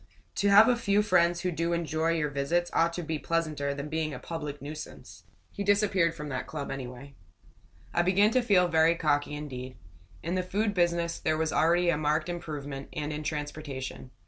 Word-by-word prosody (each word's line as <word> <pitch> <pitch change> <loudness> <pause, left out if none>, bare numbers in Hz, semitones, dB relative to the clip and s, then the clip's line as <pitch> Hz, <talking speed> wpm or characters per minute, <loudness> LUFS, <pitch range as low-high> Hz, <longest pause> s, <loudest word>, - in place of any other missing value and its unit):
"To 200 - +2
have 205 +2 +8
a 250 - +4
few 210 -3 +2
friends 175 -3 +3
who 180 - -1
do 170 +1 -1
enjoy 165 -1 0
your 150 -3 -1
visits 155 +6 0
ought 170 +1 +3
to 175 - -4
be 160 -1 -3
pleasanter 155 -4 -1
than 140 +1 -5
being 155 -1 -2
a - - -7
public 150 -3 -6
nuisance." 150 +2 -9 0.3
He 200 - -4
disappeared 200 -4 +2
from 150 - -6
that 135 - -4
club, 145 -3 -5
anyway. 135 +1 -7 0.8
I - - +3
began 195 +4 +4
to 255 - +3
feel 195 -6 +4
very 160 0 +4
cocky 150 -2 0
indeed. 130 -3 -7 0.5
In 170 - -2
the 185 - +1
food 205 +3 -1
business 170 -2 +1
there 155 0 0
was 160 0 -1
already 175 +2 +3
a 150 - -1
marked 155 +2 0
improvement; 145 -5 -6
and 150 0 -3
in 150 - -4
transportation. 145 -4 -5
160 Hz, 190 wpm, -28 LUFS, 150-175 Hz, 0.8 s, have